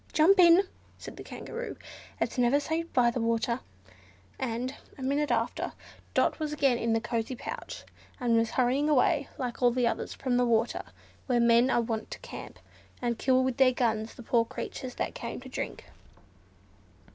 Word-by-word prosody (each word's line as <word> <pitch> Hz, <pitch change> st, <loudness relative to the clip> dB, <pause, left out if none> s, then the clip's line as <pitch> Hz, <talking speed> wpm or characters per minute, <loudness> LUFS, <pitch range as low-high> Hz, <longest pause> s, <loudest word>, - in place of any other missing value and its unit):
"Jump 365 Hz, +5 st, +5 dB
in!" 345 Hz, +2 st, +8 dB, 0.3 s
said -, -, -9 dB
the -, -, -9 dB
Kangaroo, 485 Hz, +2 st, -6 dB, 0.4 s
"it's -, -, -1 dB
never 245 Hz, +4 st, +4 dB
safe 325 Hz, +3 st, -3 dB
by 240 Hz, -2 st, +4 dB
the 240 Hz, -, -2 dB
water," 230 Hz, +1 st, 0 dB, 0.8 s
and, 250 Hz, +1 st, -2 dB, 0.2 s
a 265 Hz, -, -7 dB
minute 285 Hz, +3 st, +1 dB
after, -, -, -1 dB, 0.4 s
Dot -, -, +2 dB
was 305 Hz, -1 st, -2 dB
again 275 Hz, -5 st, +2 dB
in 230 Hz, 0 st, +1 dB
the 225 Hz, -, +3 dB
cosy 235 Hz, +1 st, -2 dB
pouch, -, -, -7 dB, 0.4 s
and 240 Hz, -2 st, +2 dB
was 225 Hz, 0 st, +2 dB
hurrying 260 Hz, +4 st, +1 dB
away, 290 Hz, +1 st, +3 dB
like 250 Hz, -2 st, -4 dB
all 245 Hz, -, +6 dB
the 245 Hz, 0 st, +1 dB
others, 235 Hz, -, -2 dB
from 255 Hz, -2 st, 0 dB
the 245 Hz, -, +3 dB
water 230 Hz, 0 st, +1 dB, 0.5 s
where 250 Hz, -2 st, +2 dB
men 235 Hz, +2 st, +5 dB
are 240 Hz, -, +3 dB
wont 225 Hz, -1 st, -3 dB
to -, -, -7 dB
camp, -, -, -9 dB, 0.4 s
and 235 Hz, -2 st, -2 dB
kill 260 Hz, 0 st, +3 dB
with 260 Hz, -2 st, -1 dB
their 260 Hz, -1 st, +5 dB
guns 225 Hz, -3 st, -1 dB
the 240 Hz, -, -10 dB
poor 230 Hz, +1 st, +3 dB
creatures 250 Hz, +2 st, -6 dB
that -, -, -2 dB
come 235 Hz, -, -5 dB
to 260 Hz, +1 st, -11 dB
drink. -, -, -5 dB
250 Hz, 180 wpm, -29 LUFS, 235-275 Hz, 0.8 s, in